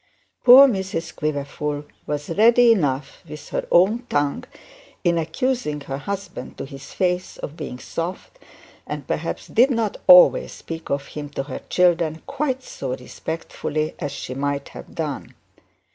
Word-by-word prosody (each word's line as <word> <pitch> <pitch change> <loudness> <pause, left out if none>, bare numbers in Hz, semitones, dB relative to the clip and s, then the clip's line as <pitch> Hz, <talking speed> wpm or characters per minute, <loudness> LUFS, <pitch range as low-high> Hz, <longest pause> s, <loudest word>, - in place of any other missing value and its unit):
Poor 260 +3 +10
Mrs 190 -7 -3
Quiverful 150 0 -3 0.2
was 150 +1 -3
ready 235 +5 +6
enough 145 -9 0
with 150 -1 -9
her - - -3
own 195 +7 +5
tongue 145 -1 0 0.6
in 170 -1 +2
accusing 165 - -1
her 135 0 -5
husband 200 -7 -6
to - - -5
his 135 -1 -11
face 180 -1 -1
of 150 - -7
being 150 -6 -6
soft, 175 - -6 0.5
and - - -5
perhaps - - -3
she - - -16
did 245 +4 +5
not 230 -5 -1
always - - +7
speak 165 0 -8
of 140 0 -1
him 145 -1 -6
to 140 -1 -4
her 135 -1 -6
children 170 -3 +2
quite 265 -3 -2
so 130 - -5
respectfully 155 +3 -4
as 145 -4 -3
she 130 - -6
might 140 +1 -2
have - - -11
done. 150 -4 -4
160 Hz, 150 wpm, -22 LUFS, 145-205 Hz, 0.6 s, Poor